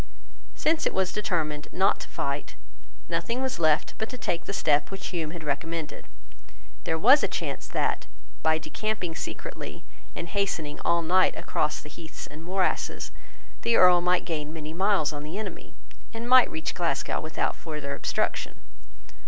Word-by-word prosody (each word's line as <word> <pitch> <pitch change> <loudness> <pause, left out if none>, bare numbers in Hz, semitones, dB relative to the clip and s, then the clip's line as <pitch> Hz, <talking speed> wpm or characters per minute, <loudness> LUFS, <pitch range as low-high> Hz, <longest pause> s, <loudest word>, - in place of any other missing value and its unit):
Since 320 0 +2
it - - -2
was 190 -1 +1
determined 155 -7 -1
not 190 +2 +3
to - - -7
fight, 140 +1 -3 0.5
nothing 170 +9 -1
was 260 -7 -1
left 155 -2 +3
but 220 - -1
to 255 - -6
take 170 -7 -2
the - - -3
step 150 -6 +2
which 190 -1 -5
Hume 165 -4 -2
had 170 0 -7
recommended. 155 +2 -3 0.8
There 160 - +1
was 260 - +7
a - - +2
chance - - -3
that, - - 0 0.3
by 160 0 +4
decamping 185 +1 -2
secretly, 70 - -6 0.3
and 170 - -4
hastening 170 -6 -1
all 170 0 +2
night 185 +3 +4
across 150 0 -1
heaths 155 +2 -9
and 155 +2 -10
morasses, 185 +2 0 0.5
the 235 - +3
Earl 180 -1 +7
might 180 0 +2
gain 155 -3 -2
many 155 -1 -6
miles 190 -4 +2
on 145 - -5
the 155 +6 -5
enemy, 215 - -6 0.4
and 230 +1 -4
might 255 0 +7
reach 160 0 -3
Glasgow 170 -2 0
without 155 0 -1
further 150 -3 -5
obstruction. - - -1
170 Hz, 160 wpm, -27 LUFS, 155-195 Hz, 0.8 s, was